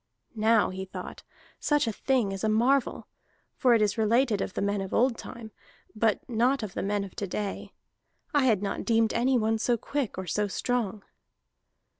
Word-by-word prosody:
"Now," 220 Hz, -2 st, +3 dB
he 190 Hz, 0 st, -5 dB
thought, 190 Hz, -, -8 dB, 0.4 s
"such 295 Hz, -2 st, +2 dB
a 225 Hz, -, -1 dB
thing 240 Hz, -2 st, 0 dB
is 195 Hz, +1 st, -5 dB
a 220 Hz, -, +2 dB
marvel, 245 Hz, +5 st, +1 dB, 0.5 s
for 250 Hz, -3 st, +3 dB
it 220 Hz, -, +3 dB
is 210 Hz, +2 st, 0 dB
related 225 Hz, -1 st, +2 dB
of -, -, -4 dB
the -, -, -1 dB
men 200 Hz, 0 st, 0 dB
of 195 Hz, -, -4 dB
old 245 Hz, +1 st, +3 dB
time, 230 Hz, -2 st, -9 dB, 0.4 s
but 220 Hz, -1 st, +1 dB
not 245 Hz, +2 st, +1 dB
of 200 Hz, -3 st, -5 dB
the -, -, -3 dB
men 205 Hz, +1 st, -1 dB
of 195 Hz, -, -10 dB
to 200 Hz, -, -3 dB
day. 200 Hz, +2 st, -4 dB, 0.6 s
I 290 Hz, -3 st, +3 dB
had 215 Hz, -6 st, +2 dB
not 200 Hz, -, -2 dB
deemed 225 Hz, -1 st, +2 dB
anyone 235 Hz, -3 st, +2 dB
so 240 Hz, +1 st, +1 dB
quick 275 Hz, -1 st, -3 dB
or 190 Hz, -, -4 dB
so 210 Hz, +3 st, 0 dB
strong." 220 Hz, -1 st, -2 dB
220 Hz, 185 wpm, -28 LUFS, 205-245 Hz, 0.6 s, Now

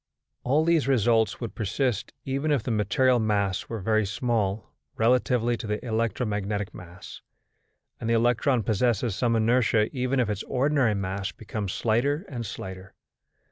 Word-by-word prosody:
All 145 Hz, +5 st, +2 dB
these 165 Hz, -5 st, +2 dB
results 115 Hz, -3 st, +2 dB
would 115 Hz, -3 st, -5 dB
persist 115 Hz, +1 st, -1 dB
even 140 Hz, +3 st, -1 dB
if 140 Hz, -7 st, +1 dB
the 125 Hz, -, -2 dB
material 115 Hz, +4 st, +2 dB
mass 100 Hz, -3 st, 0 dB
were 115 Hz, -, -4 dB
very 110 Hz, +1 st, +1 dB
small 105 Hz, -2 st, -1 dB, 0.2 s
relatively 120 Hz, 0 st, +2 dB
to 110 Hz, -, -6 dB
the 105 Hz, +3 st, -3 dB
electromagnetic 105 Hz, -3 st, -2 dB
mass; 90 Hz, 0 st, -11 dB, 0.8 s
and 115 Hz, -, -3 dB
the 115 Hz, -, +3 dB
electron 120 Hz, +1 st, +2 dB
possesses 115 Hz, 0 st, +1 dB
some 120 Hz, -2 st, +1 dB
inertia 115 Hz, +1 st, +2 dB
even 130 Hz, +1 st, 0 dB
if 120 Hz, -, +2 dB
its 105 Hz, -2 st, -2 dB
ordinary 130 Hz, -4 st, +1 dB
mass 100 Hz, +1 st, -3 dB
becomes 105 Hz, -3 st, -5 dB
slighter 140 Hz, -, 0 dB
and 120 Hz, -5 st, -5 dB
slighter. 95 Hz, -3 st, -8 dB
115 Hz, 145 wpm, -26 LUFS, 105-125 Hz, 0.8 s, the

